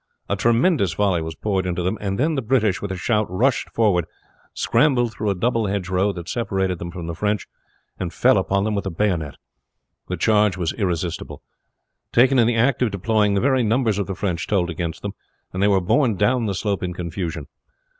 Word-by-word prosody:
A 100 - 0
tremendous 115 - +2
volley 95 -3 +1
was 80 0 -5
poured 95 -3 -1
into 90 0 -2
them, 95 +4 0
and 100 -1 -2
then 155 +5 +1
the 135 - -1
British 110 -5 +1
with 100 - -4
a - - -2
shout 105 +4 0
rushed 120 +9 +1
forward, 100 -7 +2 0.5
scrambled 120 -6 +2
through 110 -1 -2
a 100 - +1
double 115 +3 0
hedgerow 95 0 0
that 85 -2 -8
separated 95 -6 -1
them 85 - -5
from 85 -1 -7
the 85 - -4
French, 105 +4 -1 0.5
and - - -3
fell - - +3
upon 100 0 0
them 110 +1 -1
with 100 -1 -2
the - - -1
bayonet. 85 -5 -1 0.7
The 90 - -3
charge 105 +1 +3
was 85 -3 -1
irresistible. 90 -5 -3 0.7
Taken 130 +2 +4
in 115 - +4
the 120 - +1
act 125 +3 +2
of 125 - +3
deploying, 105 +1 +1
the 100 - +1
very 130 -1 +3
numbers 110 -2 +1
of 100 - -2
the 95 - -4
French 90 -4 -2
told 90 -4 +1
against 85 0 -4
them, 100 -1 -4 0.4
and 95 - -2
they 100 - +4
were 100 -2 +4
borne 115 +5 +2
down 115 +4 +1
the 100 - -2
slope 100 0 -1
in 90 -1 -3
confusion. 85 -3 -4
100 Hz, 205 wpm, -22 LUFS, 90-115 Hz, 0.7 s, Taken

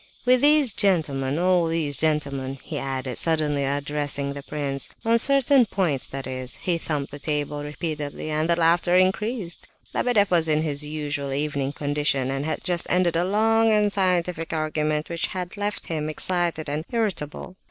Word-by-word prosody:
With 250 0 +4
these 290 -5 +5
gentlemen... 150 -9 +1
all 180 -1 +2
these 160 -3 -1
gentlemen," 140 -3 -1
he - - -4
added, 130 -2 -1
suddenly 155 -3 +2
addressing 145 0 -1
the 140 - -7
prince, 140 -2 -2 0.2
"on 230 +1 +4
certain 275 -1 +4
points... 155 -12 -1
that 135 0 -6
is..." 130 -1 -5
He 175 -2 -1
thumped 150 -4 -3
the 145 - -8
table 150 0 -2
repeatedly, 150 0 -4
and 155 +2 0
the 170 - +4
laughter 170 +1 +3
increased. 190 +1 0 0.3
Lebedeff 215 -6 +2
was 165 -2 +3
in 155 0 +2
his 145 -2 -2
usual 145 -2 -3
evening 140 -1 -1
condition, 145 -3 0
and 135 +1 -2
had 155 - -3
just 175 -1 -1
ended 180 -2 +2
a 170 - +2
long 225 +3 +3
and 210 -1 +2
scientific 180 -4 0
argument, 155 -1 -1
which 170 -1 -1
had 180 0 -5
left 205 0 -3
him 155 -2 -3
excited 170 -1 0
and 150 +2 -2
irritable. 195 - -3
155 Hz, 165 wpm, -24 LUFS, 145-185 Hz, 0.3 s, these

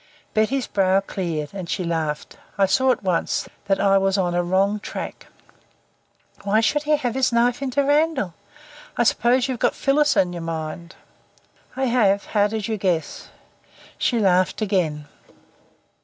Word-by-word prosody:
Betty's 240 +5 +1
brow 190 -1 +2
cleared, 170 -6 -4
and 185 -4 -6
she 185 - -2
laughed. 160 -3 -3 0.2
I 200 - +4
saw 260 +8 +2
at 250 - -2
once 180 -3 -1 0.2
that 195 -1 +1
I 195 -1 +4
was 195 0 +1
on 180 -2 0
a 175 - +1
wrong 195 +4 +1
track. - - -7 1.2
"Why 205 +2 +2
should 290 +6 +1
he 300 - +4
have 245 -5 -2
his 260 0 +1
knife 240 +2 +2
into 275 +1 0
Randall? 290 - +1 0.6
I 240 - +3
suppose 250 0 +2
you've 255 -3 -3
got - - +1
Phyllis 295 +1 +2
in 180 -1 +2
your 170 - -6
mind." 165 +1 -6 0.8
"I 265 0 0
have. 210 -5 +2
How 205 -1 +2
did 215 -1 -4
you 220 -1 -2
guess?" 180 -5 -2 0.7
She 240 - +1
laughed 185 -4 +2
again. 180 -8 -1
200 Hz, 155 wpm, -22 LUFS, 180-245 Hz, 1.2 s, I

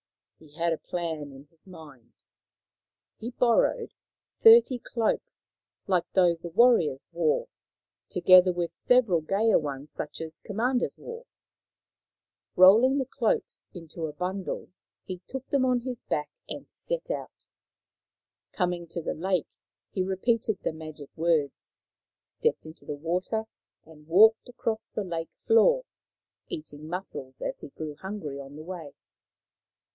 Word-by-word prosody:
He 150 -2 -18
had 170 0 +1
a 160 - -5
plan 160 -5 -4
in 135 +1 -13
his 165 +2 -26
mind. 150 -9 -14 1.1
He 230 - -4
borrowed 250 - +2 0.5
thirty 450 - +7
cloaks 235 - -3 0.3
like 180 -3 0
those 175 -3 +3
the 170 - -6
warriors 170 - +4
wore, 165 -3 +1 0.6
together 180 +1 +6
with 175 -1 -3
several 225 -7 +3
gayer 200 +7 +3
ones 145 -1 -6
such - - -5
as 160 0 -6
commanders 245 +5 -1
wore. 475 +1 -9 1.3
Rolling 220 +9 +7
the 270 - 0
cloaks 235 -3 -2
into 165 -1 -6
a 150 - -7
bundle, 185 +4 -4 0.3
he 185 -1 -6
took 265 -1 -6
them 275 -2 +2
on 250 -1 +2
his 250 -1 -5
back 150 -1 -2 0.2
and - - -7
set - - -3
out. - - -6 1.1
Coming 175 -2 -1
to 170 - -5
the - - -2
lake, 180 0 -1 0.4
he 190 - -1
repeated 210 +3 0
the - - -1
magic 155 -2 -9
words, 160 -3 0 0.5
stepped 465 - -1
into 155 +1 -12
the 150 - -4
water, 180 +8 -1 0.4
and 155 -1 -17
walked 220 +8 +5
across 225 -2 -3
on 210 - +1
the 175 -3 -4
lake 165 0 -4 0.2
floor, 355 - +5 0.6
eating 155 - -8
mussels 160 -7 -6
as - - -3
he - - -10
grew 155 +1 -6
hungry 180 -7 -6
on 140 +1 -10
the 155 - -9
way. 165 -5 -8
180 Hz, 140 wpm, -27 LUFS, 160-230 Hz, 1.3 s, thirty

